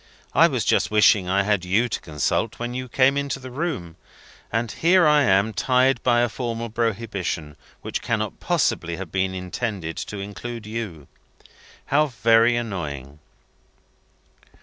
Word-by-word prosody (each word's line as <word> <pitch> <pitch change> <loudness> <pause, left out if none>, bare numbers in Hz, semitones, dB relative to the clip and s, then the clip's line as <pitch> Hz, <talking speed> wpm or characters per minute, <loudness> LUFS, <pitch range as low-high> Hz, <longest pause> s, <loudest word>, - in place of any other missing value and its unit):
I - - +6
was - - -2
just - - +2
wishing 105 -3 +4
I 100 +1 +2
had 100 -2 +1
you 100 +7 +2
to 120 - -4
consult, 80 +8 -1
when 120 +1 -4
you 130 0 -5
came 135 +3 +3
into 140 -1 -2
the 130 -1 -9
room. 125 - -4 0.5
And 115 0 -1
here 180 +1 +4
I 150 -1 +5
am 100 -2 +3
tried 130 +3 +2
by 120 -1 +3
a 120 - +3
formal 115 -1 -4
prohibition, 105 -9 -2 0.3
which - - -3
cannot - - -2
possibly 85 0 0
have 90 -2 -7
been 95 0 -1
intended 90 -2 -4
to 105 - -5
include 105 +3 -7
you. 105 -9 -6 0.8
How 150 +2 +2
very 115 -1 +3
annoying!" 75 - -5
115 Hz, 150 wpm, -23 LUFS, 95-125 Hz, 0.8 s, I